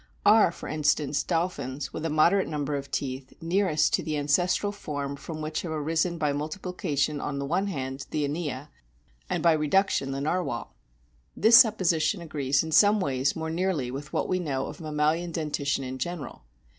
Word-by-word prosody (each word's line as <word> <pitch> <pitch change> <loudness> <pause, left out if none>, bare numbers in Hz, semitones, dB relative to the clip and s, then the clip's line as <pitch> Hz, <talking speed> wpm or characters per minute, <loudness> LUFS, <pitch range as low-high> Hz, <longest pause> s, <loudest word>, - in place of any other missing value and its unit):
Are, 210 -3 +6
for - - -9
instance, 150 -1 +1
dolphins 145 -6 -2
with - - -5
a - - 0
moderate 170 +6 +3
number 150 -1 -2
of 140 -1 -5
teeth 130 -1 -4
nearest 165 -3 +1
to - - +3
the 155 -2 -2
ancestral 175 +7 +1
form 145 -8 -5
from 155 +3 -7
which 155 0 -2
have 170 - -5
arisen 160 +3 0
by 150 -3 0
multiplication 155 -1 -2
on 140 - -3
the 140 - -3
one 180 +7 0
hand 135 -6 -4
the 150 -1 -1
Inia, 145 -2 -4 0.6
and - - -1
by 170 - +6
reduction 155 -1 +1
the 135 0 -3
Narwhal? 150 -4 -2 0.6
This 225 +2 +7
supposition 185 -8 +4
agrees 145 -4 0
in 160 - -6
some 205 +5 +5
ways 135 -5 0
more 160 0 -3
nearly 165 -7 -1
with 145 +3 -7
what - - -1
we 185 - 0
know 135 -6 -2
of - - -8
mammalian 155 +2 0
dentition 145 -4 -1
in 130 0 -6
general. 155 - -5
155 Hz, 175 wpm, -27 LUFS, 140-175 Hz, 0.6 s, This